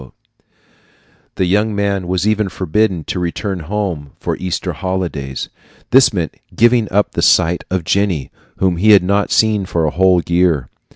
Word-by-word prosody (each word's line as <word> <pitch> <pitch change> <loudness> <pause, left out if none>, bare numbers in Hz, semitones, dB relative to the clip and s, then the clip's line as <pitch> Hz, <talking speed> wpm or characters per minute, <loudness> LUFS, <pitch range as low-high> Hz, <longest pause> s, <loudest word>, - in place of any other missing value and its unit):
The 95 - 0
young 105 +4 +1
man 100 -2 -1
was 95 +2 0
even 110 -2 +1
forbidden 95 0 -1
to 90 - -4
return 90 +2 -3
home 85 -5 -4
for - - -2
the - - -12
Easter 90 -2 -3
holidays. 85 -8 -4 0.4
This 130 0 +6
meant 85 -6 -3 0.2
giving 115 -1 +3
up 100 +2 +1
the - - -2
sight 85 +2 +3
of 95 -2 -1
Jenny, 90 -6 -1 0.3
whom 95 -2 +1
he 105 +4 +5
had 100 - +6
not 100 +2 0
seen 105 -3 +2
for 85 -2 0
a 75 - 0
whole 90 -1 +3
year. 85 -7 +1
95 Hz, 165 wpm, -17 LUFS, 85-105 Hz, 0.4 s, This